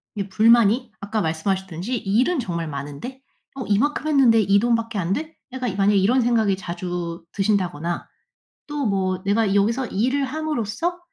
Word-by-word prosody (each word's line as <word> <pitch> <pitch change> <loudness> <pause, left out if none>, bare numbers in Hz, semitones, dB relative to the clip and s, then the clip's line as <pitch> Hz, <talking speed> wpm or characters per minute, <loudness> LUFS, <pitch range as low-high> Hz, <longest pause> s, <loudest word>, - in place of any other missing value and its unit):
이 200 -1 -4
불만이 230 +3 +4
아까 205 +2 -2
말씀하셨듯이 190 +5 -2
일은 240 - +1
정말 170 -8 -3
많은데 145 - -7 0.4
어 265 - -5
'이만큼 285 +9 +1
했는데 265 -7 +5
이 200 -1 +4
돈밖에 230 -1 0
안 175 -1 -2
돼?' 315 +9 -3 0.2
약간 255 -1 -3
이 - - -7
만약에 200 +1 +3
이런 230 +7 +3
생각이 225 -4 +2
자주 175 -2 -5
드신다거나 180 -5 -1 0.6
또 295 -2 -3
뭐 190 -2 -1
'내가 205 0 +2
여기서 230 +6 +1
일을 255 +8 0
함으로써 310 - -2
210 Hz, 340 characters per minute, -22 LUFS, 190-250 Hz, 0.6 s, 했는데